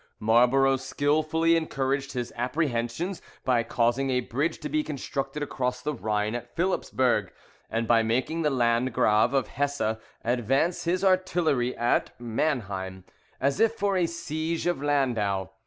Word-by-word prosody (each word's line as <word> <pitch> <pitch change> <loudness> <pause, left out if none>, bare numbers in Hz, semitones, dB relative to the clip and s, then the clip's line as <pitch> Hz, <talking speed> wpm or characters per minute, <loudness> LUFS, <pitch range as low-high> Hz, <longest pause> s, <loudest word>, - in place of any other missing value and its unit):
Marlborough 125 +5 +4
skilfully 155 +5 +1
encouraged 140 -3 -1
his 120 -2 -4
apprehensions 125 +6 -2 0.2
by 125 -2 +3
causing 120 +3 0
a 125 -1 +1
bridge 140 +7 -1
to 150 - -5
be 155 +1 +1
constructed 140 0 -4
across 125 -3 -2
the 150 - -1
Rhine 105 -3 -1
at 120 0 -6
Philipsburg, 130 - +1 0.4
and 115 0 -1
by 115 0 +5
making 130 +9 0
the 150 - +2
Landgrave 115 -4 +2
of 135 - +1
Hesse 140 -5 -1 0.3
advance 130 - +1
his 180 +3 0
artillery 175 -9 +2
at 120 0 0
Manheim, 100 -7 -2 0.4
as 140 +6 0
if 225 0 +3
for 200 -2 0
a 180 -2 +2
siege 165 0 -3
of 175 -5 0
Landau. 115 -10 0
135 Hz, 140 wpm, -27 LUFS, 120-155 Hz, 0.4 s, by